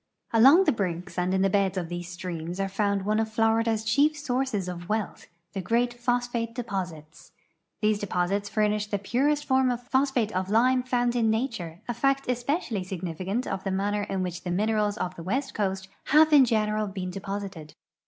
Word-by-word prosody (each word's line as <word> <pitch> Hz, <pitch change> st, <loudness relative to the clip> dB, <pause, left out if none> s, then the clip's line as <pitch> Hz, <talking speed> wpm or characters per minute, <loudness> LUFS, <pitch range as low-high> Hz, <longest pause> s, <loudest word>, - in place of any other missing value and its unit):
Along 270 Hz, +11 st, +7 dB
the -, -, +3 dB
brinks 180 Hz, -4 st, -3 dB
and 180 Hz, +1 st, 0 dB
in 190 Hz, 0 st, +2 dB
the -, -, +4 dB
beds 195 Hz, -1 st, +1 dB
of 175 Hz, -3 st, -2 dB
these 175 Hz, 0 st, -6 dB
streams 175 Hz, -1 st, -5 dB
are 195 Hz, -, 0 dB
found 200 Hz, 0 st, 0 dB
one 215 Hz, +1 st, +1 dB
of 220 Hz, 0 st, 0 dB
Florida's 225 Hz, 0 st, +2 dB
chief 285 Hz, +7 st, +3 dB
sources 255 Hz, -8 st, -1 dB
of 175 Hz, -1 st, -6 dB
wealth, 215 Hz, -2 st, -2 dB, 0.3 s
the 195 Hz, -, -3 dB
great 235 Hz, +5 st, +1 dB
phosphate 240 Hz, -1 st, -1 dB
de 245 Hz, -, -3 dB
j)Osits. 175 Hz, -7 st, -6 dB, 0.5 s
These 215 Hz, -1 st, +2 dB
dejiosits 200 Hz, +1 st, -1 dB
furnish 210 Hz, 0 st, +1 dB
the 205 Hz, -, -1 dB
purest 280 Hz, +9 st, 0 dB
form 260 Hz, -1 st, +3 dB
of 245 Hz, 0 st, -2 dB
phosphate 260 Hz, -5 st, +1 dB
of 185 Hz, +1 st, -1 dB
lime 250 Hz, +4 st, +4 dB
found 245 Hz, -1 st, 0 dB
in 230 Hz, -2 st, +2 dB
nature, 220 Hz, -8 st, -2 dB
a 240 Hz, -, -1 dB
fact 275 Hz, +3 st, +1 dB
especially 245 Hz, -, -1 dB
significant 185 Hz, +5 st, -3 dB
of 190 Hz, -1 st, -4 dB
the 195 Hz, -, -2 dB
manner 200 Hz, +2 st, 0 dB
in 195 Hz, -2 st, -2 dB
which 180 Hz, -1 st, -4 dB
the 180 Hz, -, -5 dB
minerals 210 Hz, +2 st, +1 dB
of 180 Hz, -, -3 dB
the 170 Hz, -, -8 dB
west 255 Hz, +11 st, -2 dB
coast 190 Hz, -2 st, -2 dB, 0.2 s
have 310 Hz, +1 st, +5 dB
in 280 Hz, -3 st, +8 dB
general 215 Hz, -2 st, 0 dB
been 190 Hz, -2 st, -5 dB
de 195 Hz, -, -6 dB
posited. 195 Hz, -6 st, -6 dB
210 Hz, 195 wpm, -27 LUFS, 190-245 Hz, 0.5 s, in